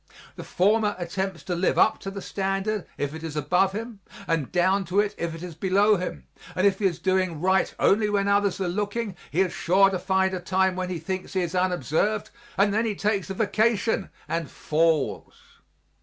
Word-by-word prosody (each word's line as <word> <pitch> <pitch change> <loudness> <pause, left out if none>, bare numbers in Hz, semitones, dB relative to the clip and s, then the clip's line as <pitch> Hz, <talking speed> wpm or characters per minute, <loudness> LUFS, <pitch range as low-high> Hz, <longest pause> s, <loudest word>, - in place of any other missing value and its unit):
The - - -8
former 210 +3 +2
attempts 185 +1 -4
to 180 - -3
live 175 +2 +1
up - - +4
to 195 - -6
the 195 -1 -7
standard, 195 +1 -2
if 145 0 -2
it 160 - -7
is 160 -2 -5
above 180 +6 +2
him, 225 0 -6 0.3
and 165 -5 -1
down 185 +2 +2
to 180 +4 0
it, 205 0 +1
if 170 -1 -4
it 165 - -9
is 180 -2 -6
below 200 +5 +3
him 75 - -5 0.3
and 185 - +1
if 195 -1 +3
he 205 - 0
is 180 -4 +1
doing 185 -4 0
right 190 +3 +2
only 210 +1 +3
when 200 -1 +1
others 200 -2 +2
are 190 - -1
looking 205 +2 -2
he 175 - +1
is 185 -2 0
sure 195 +3 +3
to 185 - -2
find 190 +1 +1
a 185 - -2
time 190 +1 +1
when 185 0 -3
he 180 - -3
thinks 185 +4 -5
he 190 - +1
is 175 0 -3
unobserved, 180 - 0 0.3
and 200 +1 +3
then 225 +2 +1
he 210 - -2
takes 200 -2 -1
a 195 - -4
vacation 220 0 +1 0.2
and 165 -4 -2
falls. 160 -2 0
190 Hz, 205 wpm, -25 LUFS, 175-200 Hz, 0.3 s, up